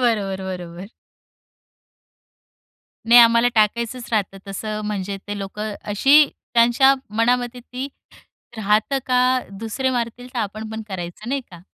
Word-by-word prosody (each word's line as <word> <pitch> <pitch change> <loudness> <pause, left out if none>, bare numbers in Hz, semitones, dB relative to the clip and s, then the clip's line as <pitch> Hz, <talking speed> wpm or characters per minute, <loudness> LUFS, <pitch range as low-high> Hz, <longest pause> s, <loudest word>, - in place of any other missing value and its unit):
बरोबर, 200 -6 0
बरोबर. 180 0 -7 2.2
नाही 240 +1 +9
आम्हाला 235 +1 +5
टाकायचंच 235 +3 0
राहतं, 195 -2 -1
तसं 215 +2 -4
म्हणजे 200 -1 -3
ते 205 - -4
लोकं 210 +2 -5 0.2
अशी 280 +8 +6 0.3
त्यांच्या 240 +4 +5 0.2
मनामध्ये 245 +1 +1
ती 255 +3 -6 0.7
राहतं 215 +6 +1
का, 255 0 +3
दुसरे 225 +6 -3
मारतील 245 0 -3
तर - - -2
आपण 215 0 -4
पण 220 0 -5
करायचं 185 +3 -6
नाही 275 +1 0
का? 175 -1 -13
220 Hz, 125 wpm, -21 LUFS, 200-245 Hz, 2.2 s, नाही